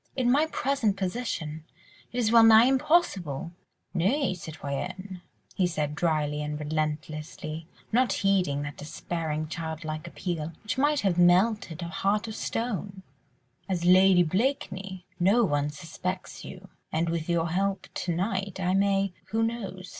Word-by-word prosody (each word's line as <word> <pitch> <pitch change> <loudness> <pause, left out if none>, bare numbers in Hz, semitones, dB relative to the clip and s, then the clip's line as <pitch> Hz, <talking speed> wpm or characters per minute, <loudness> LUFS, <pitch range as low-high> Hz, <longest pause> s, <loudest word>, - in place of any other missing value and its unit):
"In 250 -2 +2
my 295 +4 +4
present 260 -9 0
position, 180 -6 -3 0.5
it 245 - -6
is 225 -3 +2
well 230 0 +8
nigh 225 0 +8
impossible!" 255 - +1 0.4
"Nay, 200 - +1
citoyenne," 180 +4 -6 0.3
he 185 -3 +2
said 150 -3 -2
drily 150 -2 0
and 150 0 -3
relentlessly, 155 +1 -4 0.2
not 245 +2 +3
heeding 185 -8 +1
that 145 0 -6
despairing, 155 0 -4
childlike 160 0 -5
appeal, 170 -2 -4
which 210 - -2
might 290 0 +3
have 185 -3 +1
melted 180 -1 +3
a - - -4
heart 200 +4 0
of 220 - -6
stone, 200 -4 -3 0.7
"as 175 -2 -1
Lady 185 0 +6
Blakeney, 190 - -2
no 200 +7 +4
one 145 -6 +1
suspects 180 +3 -5
you, 190 +1 -10 0.2
and 165 +2 0
with 165 0 -2
your 170 -1 +1
help 195 +3 0
to 180 - -2
night 190 +1 -2
I 185 0 +1
may—who 195 +2 +1
knows? 195 -5 -4
185 Hz, 140 wpm, -27 LUFS, 160-205 Hz, 0.7 s, well